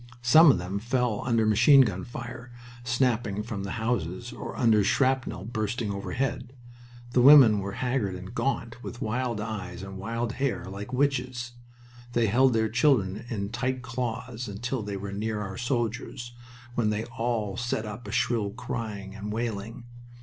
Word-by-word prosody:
Some 155 Hz, +7 st, +8 dB
of 135 Hz, -, +5 dB
them 90 Hz, +3 st, -3 dB
fell 120 Hz, -1 st, 0 dB
under 115 Hz, -3 st, +3 dB
machine 115 Hz, +6 st, +7 dB
gun 100 Hz, -7 st, 0 dB
fire 120 Hz, 0 st, -8 dB, 0.3 s
snapping 120 Hz, -4 st, 0 dB
from 110 Hz, -3 st, -5 dB
the 100 Hz, -, -4 dB
houses 115 Hz, -1 st, -2 dB
or -, -, -7 dB
under 110 Hz, -4 st, +4 dB
shrapnel 130 Hz, -5 st, +1 dB
bursting 110 Hz, -1 st, -2 dB
overhead. 125 Hz, +5 st, -3 dB, 0.6 s
The 125 Hz, -, +3 dB
women 130 Hz, -6 st, +8 dB
were 100 Hz, 0 st, -4 dB
haggard 125 Hz, -7 st, -1 dB
and 90 Hz, +4 st, -8 dB
gaunt, 120 Hz, -3 st, -2 dB
with 120 Hz, -, -7 dB
wild 120 Hz, 0 st, -1 dB
eyes 100 Hz, -4 st, -5 dB
and 95 Hz, 0 st, -8 dB
wild 115 Hz, +3 st, -2 dB
hair, 135 Hz, -8 st, -2 dB
like 100 Hz, +4 st, -7 dB
witches. 125 Hz, -3 st, 0 dB, 0.6 s
They 120 Hz, -1 st, +3 dB
held 125 Hz, +4 st, +4 dB
their 110 Hz, -1 st, +2 dB
children 110 Hz, -4 st, +2 dB
in 100 Hz, -4 st, -3 dB
tight 130 Hz, +2 st, -2 dB
claws 125 Hz, -1 st, -4 dB
until 120 Hz, +5 st, -3 dB
they 100 Hz, -1 st, -4 dB
were 100 Hz, 0 st, -6 dB
near 105 Hz, +1 st, -2 dB
our 100 Hz, -2 st, -5 dB
soldiers, 120 Hz, 0 st, -3 dB, 0.4 s
when 115 Hz, -3 st, +1 dB
they 105 Hz, +1 st, -1 dB
all 115 Hz, -3 st, -2 dB
set 120 Hz, -2 st, -2 dB
up 105 Hz, +3 st, -7 dB
a -, -, -5 dB
shrill 110 Hz, -4 st, +1 dB
crying 105 Hz, -3 st, -5 dB
and 105 Hz, 0 st, -6 dB
wailing. 115 Hz, +1 st, -4 dB
115 Hz, 160 wpm, -27 LUFS, 105-125 Hz, 0.6 s, Some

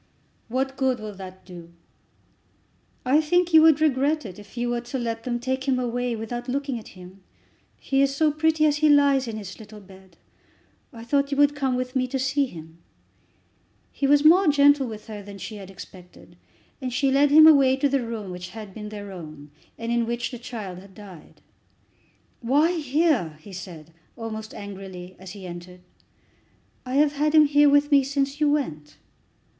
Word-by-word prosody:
"What 265 Hz, +3 st, -2 dB
good 260 Hz, -2 st, 0 dB
will 215 Hz, -1 st, -7 dB
that 185 Hz, -1 st, -11 dB
do?" 170 Hz, -2 st, -12 dB, 1.3 s
"I 280 Hz, +5 st, +4 dB
think 350 Hz, +2 st, +1 dB
you 320 Hz, -, +9 dB
would 315 Hz, -2 st, +5 dB
regret 300 Hz, 0 st, +1 dB
it 190 Hz, -1 st, -9 dB
if 205 Hz, +3 st, -15 dB
you 240 Hz, 0 st, -1 dB
were 240 Hz, 0 st, -1 dB
to 245 Hz, +2 st, -5 dB
let 230 Hz, -2 st, -4 dB
them 240 Hz, -1 st, -2 dB
take 260 Hz, +2 st, -3 dB
him 265 Hz, -2 st, +2 dB
away 245 Hz, -1 st, -2 dB
without 240 Hz, +3 st, -6 dB
looking 270 Hz, -1 st, -2 dB
at 215 Hz, -, -15 dB
him. 185 Hz, +2 st, -13 dB, 0.6 s
He 270 Hz, 0 st, 0 dB
is 275 Hz, 0 st, +1 dB
so 310 Hz, +1 st, +2 dB
pretty 310 Hz, +1 st, +1 dB
as 295 Hz, -1 st, +2 dB
he 305 Hz, 0 st, +3 dB
lays 280 Hz, -3 st, +4 dB
in 220 Hz, -1 st, -5 dB
his 200 Hz, -1 st, -9 dB
little 215 Hz, -1 st, -12 dB
bed. 190 Hz, -3 st, -18 dB, 0.7 s
I 230 Hz, -4 st, -11 dB
thought 280 Hz, +3 st, 0 dB
you 280 Hz, -, -2 dB
would 290 Hz, 0 st, +4 dB
come 265 Hz, -3 st, -1 dB
with 255 Hz, +1 st, -4 dB
me 255 Hz, -1 st, +1 dB
to 265 Hz, -, -3 dB
see 275 Hz, +1 st, 0 dB
him." 160 Hz, -5 st, -12 dB, 1.1 s
He 275 Hz, -, -1 dB
was 290 Hz, +1 st, +4 dB
more 355 Hz, +4 st, +6 dB
gentle 285 Hz, -2 st, +4 dB
with 215 Hz, -2 st, -9 dB
her 215 Hz, -2 st, -8 dB
than 200 Hz, 0 st, -11 dB
she 210 Hz, +2 st, -8 dB
had 195 Hz, -2 st, -10 dB
expected, 185 Hz, -1 st, -14 dB, 0.5 s
and 255 Hz, -1 st, -3 dB
she 270 Hz, +2 st, +1 dB
led 280 Hz, +2 st, +4 dB
him 310 Hz, +2 st, +8 dB
away 275 Hz, -4 st, +6 dB
to 275 Hz, +2 st, +1 dB
the 275 Hz, -2 st, 0 dB
room 220 Hz, -5 st, -6 dB
which 180 Hz, 0 st, -7 dB
had 210 Hz, 0 st, -10 dB
been 210 Hz, 0 st, -8 dB
their 205 Hz, -1 st, -8 dB
own, 155 Hz, -5 st, -10 dB, 0.3 s
and 230 Hz, 0 st, -4 dB
in 235 Hz, -1 st, 0 dB
which 235 Hz, +2 st, -3 dB
the 245 Hz, -, -8 dB
child 215 Hz, -7 st, -7 dB
had 190 Hz, 0 st, -16 dB
died. 190 Hz, -6 st, -14 dB, 1.0 s
"Why 285 Hz, +8 st, +2 dB
here?" 290 Hz, -, 0 dB
he 190 Hz, +5 st, -13 dB
said, 170 Hz, -3 st, -10 dB, 0.2 s
almost 220 Hz, -2 st, -7 dB
angrily, 190 Hz, -2 st, -9 dB
as 190 Hz, 0 st, -10 dB
he 200 Hz, -3 st, -10 dB
entered. 180 Hz, +1 st, -10 dB, 1.1 s
"I 255 Hz, -, -3 dB
have 290 Hz, +1 st, +3 dB
had 300 Hz, +2 st, 0 dB
him 305 Hz, -1 st, +7 dB
here 290 Hz, 0 st, +4 dB
with 290 Hz, +1 st, +3 dB
me 280 Hz, -1 st, +5 dB
since 275 Hz, +2 st, -2 dB
you 300 Hz, -, +4 dB
went." 155 Hz, -, -3 dB
245 Hz, 190 wpm, -24 LUFS, 200-285 Hz, 1.3 s, you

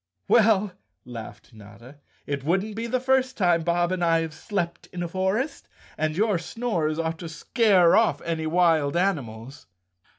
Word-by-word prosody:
"Well," 210 Hz, -3 st, +4 dB, 0.3 s
laughed 120 Hz, 0 st, -10 dB
Notta, 110 Hz, +6 st, -14 dB, 0.3 s
"it 140 Hz, -1 st, -4 dB
wouldn't 190 Hz, +7 st, 0 dB
be 230 Hz, +1 st, -4 dB
the 255 Hz, +2 st, 0 dB
first 260 Hz, 0 st, +1 dB
time 175 Hz, -4 st, +3 dB
Bob 175 Hz, +1 st, 0 dB
and 185 Hz, -1 st, -1 dB
I 165 Hz, -1 st, +3 dB
have 160 Hz, -1 st, -5 dB
slept 175 Hz, -2 st, -4 dB
in 175 Hz, -1 st, -6 dB
a -, -, -3 dB
forest, 190 Hz, -, -2 dB, 0.3 s
and 155 Hz, 0 st, -1 dB
your 210 Hz, -3 st, +2 dB
snores 170 Hz, -5 st, -2 dB
ought 165 Hz, 0 st, -2 dB
to 170 Hz, -, -7 dB
scare 185 Hz, -, +3 dB
oft 225 Hz, 0 st, +2 dB
any 160 Hz, -1 st, -2 dB
wild 160 Hz, -3 st, +2 dB
animals." 135 Hz, -, -3 dB
175 Hz, 160 wpm, -25 LUFS, 155-205 Hz, 0.3 s, Well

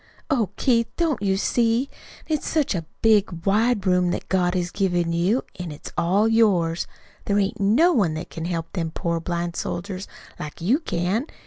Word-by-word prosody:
Oh, 235 Hz, -8 st, +2 dB
Keith, 230 Hz, -3 st, +2 dB
don't 325 Hz, -8 st, 0 dB
you 195 Hz, -1 st, +1 dB
see? 230 Hz, +5 st, +1 dB, 0.4 s
An' 315 Hz, -, -1 dB
it's -, -, -8 dB
such 305 Hz, -7 st, +1 dB
a 165 Hz, -4 st, -4 dB, 0.2 s
big, 205 Hz, -6 st, +3 dB
wide 210 Hz, +1 st, +2 dB
room 180 Hz, -1 st, +3 dB
that 175 Hz, -, -3 dB
God 180 Hz, -1 st, +1 dB
has 175 Hz, -1 st, -1 dB
given 175 Hz, -4 st, 0 dB
you, 185 Hz, +9 st, +1 dB, 0.2 s
an' 175 Hz, -3 st, -4 dB
it's 145 Hz, -, -9 dB
all 195 Hz, +6 st, +2 dB
yours. 190 Hz, -7 st, +2 dB, 0.4 s
There 200 Hz, -, +1 dB
ain't 205 Hz, +2 st, 0 dB
no 250 Hz, -, +4 dB
one 180 Hz, -, +2 dB
that 155 Hz, -, -6 dB
can 165 Hz, -, -5 dB
help 165 Hz, -2 st, -3 dB
them 170 Hz, -4 st, -2 dB
poor 170 Hz, +1 st, -2 dB
blind 170 Hz, 0 st, -3 dB
soldiers 185 Hz, +2 st, -4 dB, 0.3 s
like 150 Hz, -1 st, -7 dB
you 220 Hz, -, +2 dB
can. 210 Hz, -, -1 dB
190 Hz, 185 wpm, -23 LUFS, 170-225 Hz, 0.4 s, no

